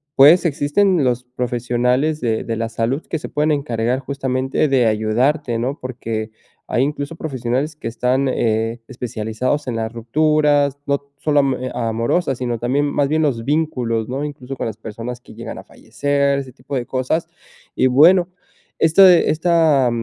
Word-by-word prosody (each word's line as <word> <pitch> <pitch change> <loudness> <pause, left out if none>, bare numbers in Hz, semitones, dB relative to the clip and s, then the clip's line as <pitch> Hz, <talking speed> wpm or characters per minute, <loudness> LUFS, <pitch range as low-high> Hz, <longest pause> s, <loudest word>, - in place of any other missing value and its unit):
pues 160 +6 +7
existen 160 +3 +2
los 125 0 0
profesionales 125 +4 -1
de 115 -2 -1
de 115 -1 -2
la 115 0 -2
salud 115 +6 -1
que 160 - -1
se - - -7
pueden 150 +1 +1
encargar 125 -4 -1
justamente 135 +1 -1
de 130 -3 +3
ayudarte, 115 +5 +1
¿no? 135 +6 -3
Porque 115 -3 -4 0.4
hay 120 - +2
incluso 145 +2 -3
profesionales 135 +1 -2
que 150 - -7
están, 125 +4 0
eh, 115 0 -1
especializados 125 +3 -3
en 115 - -2
las 110 0 -3
rupturas, 145 +3 +2
no 140 0 +1 0.2
solo 145 0 +1
amo 135 -1 0
e 130 0 -5
amorosas, 120 +5 -1
sino 120 -3 -2
también 135 +4 0
más 145 -1 0
bien 155 0 +1
los 120 -6 0
vínculos, 125 -7 -1
¿no? 135 +3 -3
Incluso 135 -2 -7
con - - -2
las 110 - -6
personas 115 +2 -7
que - - -15
llegan - - -7
a - - -11
fallecer, 140 -1 -1
ese 130 -3 -8
tipo 135 +2 -7
de 125 -2 -2
cosas. 130 +6 -1 0.5
Y 130 - +3
bueno, 175 +7 +5 0.5
esto 165 +5 +6
esta, 160 -5 +4
130 Hz, 165 wpm, -19 LUFS, 120-145 Hz, 0.5 s, pues